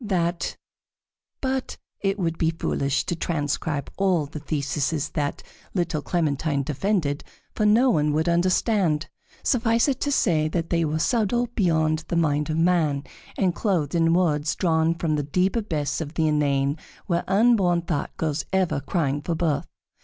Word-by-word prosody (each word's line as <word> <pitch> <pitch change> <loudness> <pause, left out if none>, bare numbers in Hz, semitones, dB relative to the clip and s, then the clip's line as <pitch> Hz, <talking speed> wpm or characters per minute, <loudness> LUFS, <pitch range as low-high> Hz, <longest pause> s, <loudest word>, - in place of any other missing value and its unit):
That 175 -4 -1 0.8
but 265 -1 -2 0.2
it 195 0 0
would 165 -4 -2
be 160 - +3
foolish 140 -4 -1
to 175 - -1
transcribe 150 -3 -2
all 185 -6 +2
the 150 +2 -8
theses 150 0 -1
that 145 -2 -3 0.3
little 170 -4 0
Clementine 150 -3 0
defended, 150 0 -1 0.3
for 215 - +1
no 240 +5 +5
one 150 -6 +2
would 155 +2 0
understand. 175 -1 +2 0.4
Suffice 230 -1 +2
it 270 -2 0
to 285 - 0
say 160 - +2
that 165 +1 -3
they 170 -1 +2
were 155 0 0
subtle 235 +6 +1
beyond 160 -5 +1
the 170 - -2
mind 150 -2 +1
of 155 - -1
man, 165 -5 +2 0.3
and 185 -3 +2
clothed 170 - 0
in 165 -1 +3
words 150 -4 +1
drawn 165 -1 +2
from 160 -2 -1
the - - +1
deep 180 - 0
abyss 165 -10 -1
of 155 +1 -6
the 160 -1 +2
inane, 140 -1 +1 0.3
where 170 -2 0
unborn 195 -4 +3
thought 160 -4 -3
goes 155 -2 -1
ever 190 -6 +1
crying 145 -1 -1
for 165 +3 -2
birth. 160 -3 0
165 Hz, 160 wpm, -24 LUFS, 150-185 Hz, 0.8 s, no